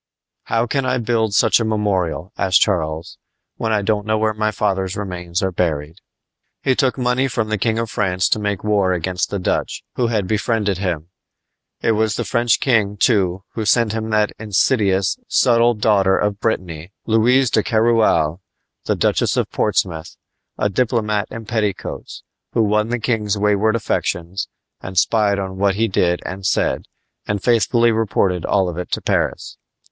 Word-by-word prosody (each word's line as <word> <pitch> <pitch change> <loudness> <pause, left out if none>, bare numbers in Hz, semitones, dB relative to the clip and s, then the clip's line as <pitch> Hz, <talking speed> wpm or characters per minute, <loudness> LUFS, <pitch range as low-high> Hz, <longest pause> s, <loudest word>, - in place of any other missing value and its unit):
"How 115 +1 0
can 135 +3 -1
I 130 0 0
build 110 -3 0
such - - +4
a - - 0
memorial," 100 -4 -1
asked 95 -2 +3
Charles, 80 -5 -1 0.4
"when 110 - -2
I 105 -2 +1
don't 105 0 0
know 110 0 +2
where 110 0 +1
my 110 0 0
father's 95 -3 -1
remains 90 -3 -3
are 95 - 0
buried!" 80 -2 -2 0.7
He 130 - +3
took 130 0 +1
money 125 +1 +1
from 115 -4 -2
the 110 - 0
King 110 +1 0
of 115 -1 -2
France 95 -3 0
to - - +1
make 105 -2 -2
war 100 -3 +2
against 90 +1 -2
the 100 - -2
Dutch, 90 - -2
who 120 - +2
had 110 -4 0
befriended 105 -2 0
him. 85 -4 -3 0.7
It - - +2
was 110 -1 +1
the - - -2
French 120 -1 +2
king, 110 -6 +1
too, 95 -4 +2
who 110 - -3
sent 110 0 +2
him 110 0 -3
that 105 -1 +2
insidious, 100 -2 +1
subtle 120 0 +3
daughter 100 -3 +3
of 105 -1 -1
Brittany, 90 -6 -3
Louise 120 +3 +3
de 110 - +3
Keroualle 110 - +2 0.4
Duchess - - +1
of - - -1
Portsmouth 85 -3 -1 0.4
a - - +1
diplomat 105 -1 0
in 115 -1 -8
petticoats, 105 -4 -3 0.3
who 115 - +3
won 105 +1 +1
the 120 - 0
king's 110 -3 -1
wayward 105 +2 +2
affections, 95 -4 -2 0.3
and 95 0 -8
spied 105 +1 +3
on 95 -1 -5
what 100 -1 +2
he 115 +2 +1
did 90 -3 0
and 95 +1 -6
said, 95 - 0 0.4
and 105 -2 -2
faithfully 115 0 +3
reported 95 -5 0
all 95 -2 +2
of 90 0 -4
it 90 - -5
to - - +1
Paris. - - -2
105 Hz, 170 wpm, -19 LUFS, 95-115 Hz, 0.7 s, such